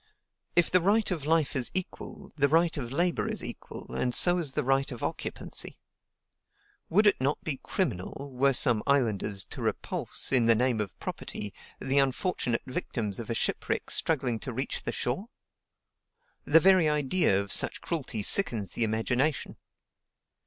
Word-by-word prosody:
If 175 - +3
the 185 - +4
right 205 +3 +1
of 155 -5 -4
life 160 -3 +1
is 130 -3 +3
equal, 185 -1 -3
the 140 -2 +2
right 165 +2 +2
of 125 -6 -5
labor 175 +5 0
is - - -1
equal, - - -8
and 125 -1 0
so 175 0 +7
is 150 -6 -2
the - - -1
right 135 +1 0
of 120 - -8
occupancy. - - -3 1.1
Would 210 +6 +3
it 205 - +3
not 140 +3 -1
be 145 -4 -4
criminal, 140 - -4
were 135 +2 +2
some 120 -4 +4
islanders 110 -7 0
to - - -8
repulse, - - -2
in 125 -4 +4
the 115 - +5
name 120 -1 0
of 100 -4 -6
property, 105 -1 -6 0.3
the 135 +1 0
unfortunate 135 -2 -1
victims 110 -5 -4
of 115 - -7
a 115 - -2
shipwreck - - -2
struggling 130 -8 0
to 130 - -6
reach 130 +4 -4
the - - -3
shore? 135 - -3 1.2
The 160 +3 +6
very 185 -2 +4
idea 150 - +1
of 100 -1 -4
such - - +1
cruelty 130 -10 -4
sickens 110 - +5
the 120 - -1
imagination. 125 +7 -1
135 Hz, 160 wpm, -28 LUFS, 115-165 Hz, 1.2 s, so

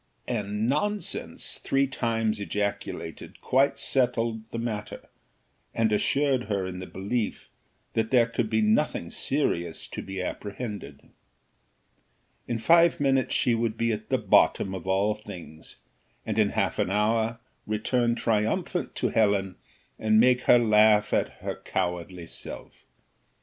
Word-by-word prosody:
And 105 -2 -2
nonsense! 205 +10 -2
three 135 0 +1
times 115 -4 -1
ejaculated, 100 0 -4
quite 135 +2 +2
settled 115 -4 0
the - - -5
matter, 110 -3 -5 0.7
and 115 -1 +2
assured 135 +4 +1
her 100 -3 -1
in 90 0 -6
the 90 - -7
belief 105 +4 -3 0.4
that 110 0 0
there 120 -3 +5
could 115 -1 -2
be 110 -1 +2
nothing 105 - +1
serious 85 - 0
to - - -6
be 95 0 -6
apprehended. 100 - -6 1.5
In 120 - -1
five 170 +7 +4
minutes 135 -2 +1
she - - +2
should 115 -1 0
be 115 0 +1
at 105 - -5
the - - +2
bottom 95 - +3
of 95 -1 -7
all 100 +3 +2
things, 90 -7 -11 0.5
and - - -1
in - - +4
half - - -1
an - - +1
hour 110 +3 +1 0.3
return 120 +3 +1
triumphant 110 -2 -1
to - - 0
Helen, 100 -4 +1 0.4
and 110 0 +3
make 125 +1 +4
her - - +7
laugh 105 -2 +4
at - - +2
her - - -4
cowardly 90 0 -3
self. - - -9
110 Hz, 135 wpm, -27 LUFS, 100-120 Hz, 1.5 s, her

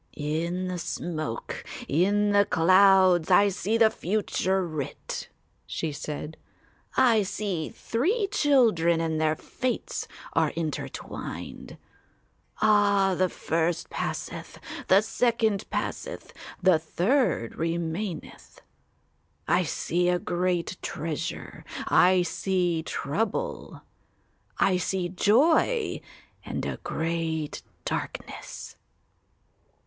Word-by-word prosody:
"In 170 +5 -2
the 180 -1 -3
smoke, 155 -7 -4 0.2
in 205 +7 +2
the 200 0 +5
clouds, 185 0 +5
I 205 0 +6
see 205 +3 0
the 225 -1 +5
future 190 -1 0
writ," 155 -5 -5 0.4
she 160 - -3
said; 150 +1 -6 0.6
"I 235 -4 +5
see 195 -4 -2
three 340 - 0
children 225 - +3
and 160 -1 -1
their 155 0 +2
fates 255 +8 -3 0.3
are - - +3
intertwined. 160 -2 -5 0.9
Ah, 205 -2 +4
the 185 +1 +2
first 165 +1 -1
passeth, - - -4 0.3
the 190 +2 +6
second 220 -2 +1
passeth, - - -4 0.3
the 180 -4 +5
third 180 - +1
remaineth. 165 +2 -4 0.9
I 180 - +4
see 175 +1 0
a 180 - +3
great 175 0 -1
treasure. 155 -1 -4 0.2
I 185 0 +5
see 175 -1 0
trouble. 215 - -3 0.7
I 185 -1 +3
see 180 0 -1
joy 290 - +3 0.4
and - - -4
a - - -3
great 160 -2 -2 0.2
darkness." - - -5
180 Hz, 95 wpm, -27 LUFS, 165-205 Hz, 0.9 s, I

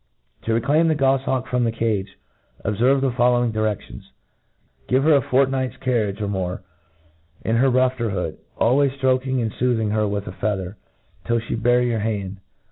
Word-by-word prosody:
To 115 - +1
reclaim 145 +8 +2
th^ 160 -2 +2
gofliawk 135 -2 +1
from 125 -1 0
the 115 - +1
cage, 110 -4 -2 0.5
ob 105 - 0
ferve 130 +4 +3
the 135 -1 +1
following 120 -1 +2
diredions. 110 -2 -3 0.8
Give 130 +2 +2
her 155 +1 +5
a 140 - +5
fort 135 +2 +2
night's 130 -1 -2
carriage, 110 -6 -1
or 105 - -1
more, 95 -2 -3 0.8
in 115 +1 +1
her 135 +3 +4
rufter 130 -2 +1
hood, 90 -5 -3 0.2
al 120 +4 +3
ways 140 -2 +2
ftroking.and 130 -3 0
foothing 115 -4 0
her 105 0 +1
with 100 0 -3
a - - -6
feather, 95 -1 -3 0.5
tfiU 115 -1 0
flie - - 0
bear 120 +2 +3
your 120 -2 0
hand. 100 -3 -3
120 Hz, 175 wpm, -22 LUFS, 105-130 Hz, 0.8 s, her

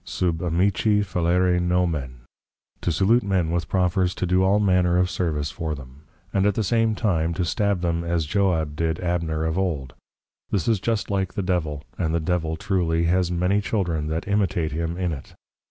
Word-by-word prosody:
Sub 85 -3 -1
Amici 95 +4 +2
fallere 90 -1 +1
Nomen, 85 -8 -1 0.6
to - - 0
Salute 100 +9 +3
men 95 -5 0
with 85 0 -2
profers 90 -1 +1
to - - -2
do 90 +1 +2
all 95 +2 +3
manner 90 -3 +3
of 90 0 +2
Service 80 -5 -1
for 80 -3 -3
them; 70 +2 -13 0.3
and 100 +1 +3
at 105 - +1
the 110 - 0
same 115 +1 +2
time 85 -7 0
to 90 - 0
Stab 100 +1 0
them 85 -1 0
as 85 -2 0
Joab 80 -4 0
did 80 +1 -1
Abner 85 -3 -1
of 80 +3 -1
old; 75 -9 -2 0.6
this 95 -6 -1
is 110 -4 +2
just 110 0 -1
like 95 -2 -1
the 100 - -1
Devil, 80 -6 -1 0.2
and 80 -2 0
the - - +2
Devil 80 -1 -1
truly 85 -3 0
has 90 +1 +2
many 90 +4 +1
Children 85 -8 -1
that 80 +3 -3
Imitate 95 -6 0
him 85 +3 -3
in 90 -2 -1
it. 70 -4 -8
90 Hz, 185 wpm, -24 LUFS, 80-95 Hz, 0.6 s, Salute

